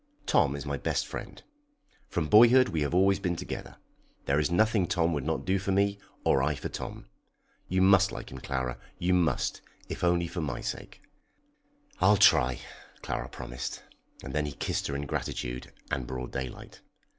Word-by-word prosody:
Tom - - +3
is - - -6
my - - -2
best - - -1
friend. - - -8 0.7
From 80 -3 -1
boyhood 120 - +7
we 80 - -1
have 70 - +1
been 90 - +1
always 95 0 +4
together. 90 -2 -4 0.5
There 70 +1 +2
is 75 - +1
nothing 105 +1 +3
Tom 85 -4 +1
would 75 -3 -2
not 80 +3 -2
do 95 +1 +2
for 95 +1 -2
me, 100 +1 +2 0.3
or 65 - +4
I 75 +3 +1
for - - -5
Tom. - - -6 0.6
You 95 +1 +2
must 100 0 +5
like - - -7
him, 65 - -7
Clara; 65 -2 -3 0.2
you 90 +1 +1
must, 85 -7 +1 0.3
if - - -5
only 85 0 +3
for 85 +1 -4
my 70 -5 -3
sake." - - -6 1.0
"I'll 105 - +5
try," 65 -8 +5 0.5
Clara - - -3
promised, 60 0 -6 0.4
and 65 - -6
then 75 0 0
he 75 - -5
kissed - - -2
her 70 - -3
in 70 +1 -3
gratitude 60 -2 -4 0.2
and 65 -3 -2
broad 65 -1 -5
daylight. 65 -1 -6
80 Hz, 180 wpm, -29 LUFS, 65-95 Hz, 1.0 s, boyhood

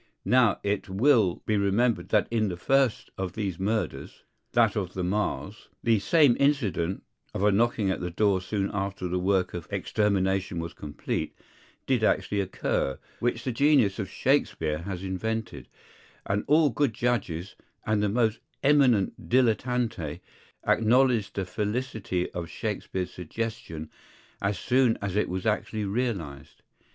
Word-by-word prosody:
Now 125 -5 +4
it 100 0 -1
will 105 -2 +3
be 110 - +1
remembered 100 -1 +1
that 105 - +3
in 110 -2 +1
the 90 - -4
first 135 +4 +1
of 95 -2 -3
these 100 -5 -3
murders, 110 +3 -2 0.3
(that 115 -3 +4
of 95 -4 -3
the 95 - -2
Marrs,) 100 +2 -2 0.2
the 115 -2 +3
same 145 - +4
incident 105 - +1 0.3
(of 95 - -1
a 105 - +5
knocking 110 -1 +2
at - - -2
the 90 - -3
door 95 +1 +2
soon 100 +1 -2
after 100 -2 -3
the 90 +1 -1
work 95 0 +1
of 85 -3 -6
extermination 95 -3 0
was 85 0 -4
complete) 75 +1 -4 0.5
did 125 -4 +1
actually 105 -1 +1
occur, 90 -7 -1 0.2
which 120 - -1
the 130 - -1
genius 130 -6 +3
of 95 -3 -3
Shakspeare 80 - 0
has 90 +1 -5
invented; 95 - -3 0.6
and 100 +1 0
all 150 -1 +4
good 120 -1 0
judges, 95 -7 -1 0.3
and 110 -1 +1
the 105 - +1
most 110 0 +1 0.2
eminent 135 -8 +3
dilettanti, 115 - +1 0.5
acknowledged 120 -1 +3
the 95 - -1
felicity 105 -2 -2
of 85 -2 -5
Shakspeare's 90 -1 -4
suggestion 85 -4 -5 0.5
as 100 0 0
soon 125 -2 +2
as 100 -2 -3
it 105 - +1
was 90 0 -3
actually 110 0 -1
realized. 100 - -3
105 Hz, 145 wpm, -27 LUFS, 95-120 Hz, 0.6 s, a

